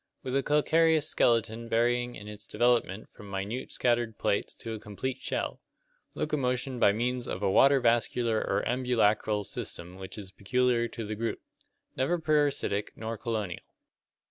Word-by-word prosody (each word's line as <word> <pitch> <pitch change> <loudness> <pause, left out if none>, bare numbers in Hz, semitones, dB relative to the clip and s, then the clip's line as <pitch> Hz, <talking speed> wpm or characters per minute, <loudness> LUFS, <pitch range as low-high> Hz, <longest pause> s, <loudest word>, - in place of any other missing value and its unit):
With 130 -1 -3
a 140 - +3
calcareous 155 +2 +3
skeleton 115 -2 +1
varying 120 +1 +1
in 105 - -9
its 105 0 -9
development 115 -3 +1
from 105 - -12
minute 100 +6 -4
scattered 120 -3 0
plates 100 - -1
to 115 - -6
a 110 - -5
complete 115 +6 -4
shell. - - -3 0.5
Locomotion 125 -3 -1
by 100 - +6
means 120 +3 -1
of 95 - -4
a 95 - +2
water 140 +6 +6
vascular 120 -1 +2
or - - 0
ambulacral - - -4
(Lat. - - +1 0.5
ambulac - - -17
rum, 105 -1 +2
walk) 105 - -4
system 85 -1 -5
which 95 +2 -8
is 100 -3 -8
peculiar 120 +4 +1
to 115 -1 -6
the 105 - -4
group. 115 +2 -2 0.6
Never 150 +7 +1
parasitic 145 -10 +1
nor 110 +1 -4
colonial. 110 -6 -3
115 Hz, 170 wpm, -29 LUFS, 105-125 Hz, 0.6 s, by